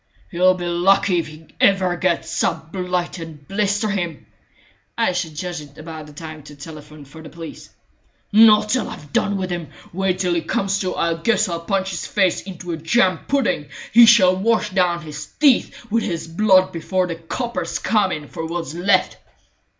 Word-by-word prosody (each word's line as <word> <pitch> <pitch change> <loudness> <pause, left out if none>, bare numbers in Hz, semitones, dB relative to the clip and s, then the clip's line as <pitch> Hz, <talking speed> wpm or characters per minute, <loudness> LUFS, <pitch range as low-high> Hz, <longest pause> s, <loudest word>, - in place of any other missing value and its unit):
"He'll 185 +1 +4
be 175 -1 -5
lucky 180 +1 +3
if 165 - -3
he 155 +1 -13 0.2
ever 190 -3 +3
gets 175 -1 -1
up, 160 -1 -2
blight 180 -1 -2
and 155 -4 -10
blister 205 +2 0
him!" 175 -7 -3 0.7
"I - - +2
should 175 -4 -3
judge 175 0 -4
it 145 -1 -15
about 155 -2 -9
time 155 -1 -8
to 150 +1 -13
telephone 150 0 -11
for 160 +4 -13
the 160 - -10
police." 165 -1 -10 0.6
"Not 215 0 +6
till 255 +3 0
I've 145 -1 -11
done 200 -1 +1
with 185 -1 -3
him. 175 -3 -4 0.3
Wait 190 0 0
till 180 -2 0
he 170 - 0
comes 195 +3 -1
to! 185 -2 -2
I 170 0 +1
guess 215 +5 +1
I'll 170 -2 -3
punch 190 +3 -1
his 175 - -4
face 190 -3 +1
into 180 -2 -8
a 165 - -3
jam 180 +2 +2
pudding! 265 - 0 0.2
He 235 0 +8
shall 190 -6 +6
wash 210 +2 +1
down 180 -2 +1
his 150 -1 -7 0.2
teeth 275 -4 +2
with 230 +1 +2
his 170 -4 -3
blood 185 +2 +3
before 180 +3 -1
the 175 - -4
coppers 180 +1 -4
come 205 -2 +1
in 150 -1 -5
for 160 - -7
what's 165 -3 -4
left!" 180 +4 +1
180 Hz, 185 wpm, -21 LUFS, 165-195 Hz, 0.7 s, He